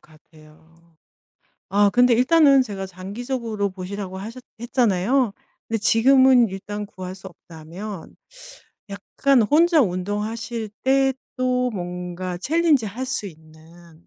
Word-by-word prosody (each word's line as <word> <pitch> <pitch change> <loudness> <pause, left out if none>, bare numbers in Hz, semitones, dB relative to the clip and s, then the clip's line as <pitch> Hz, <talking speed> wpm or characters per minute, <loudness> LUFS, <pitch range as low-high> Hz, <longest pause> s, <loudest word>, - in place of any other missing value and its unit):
같아요. 160 +1 -22 0.7
아 205 +1 +4
근데 245 +1 +4
일단은 275 +2 +5
제가 200 -6 -5
장기적으로 210 +3 -4
보시라고 190 0 -7
하셨 230 +6 -8 0.2
했잖아요. 235 0 +1 0.3
근데 225 - -1
지금은 250 +2 +4
일단 205 +2 -6
구할 185 -2 -8
수 190 0 -11
없다면 175 +3 -10 0.8
약간 240 +6 +1
혼자 320 - +4
운동하실 215 +3 -3
때 270 0 +3 0.2
또 250 -1 0
뭔가 180 -2 -5
챌린지 300 - +2
할 230 +6 -5
수 255 -5 -3
있는 160 0 -16
205 Hz, 250 characters per minute, -22 LUFS, 180-250 Hz, 0.8 s, 일단은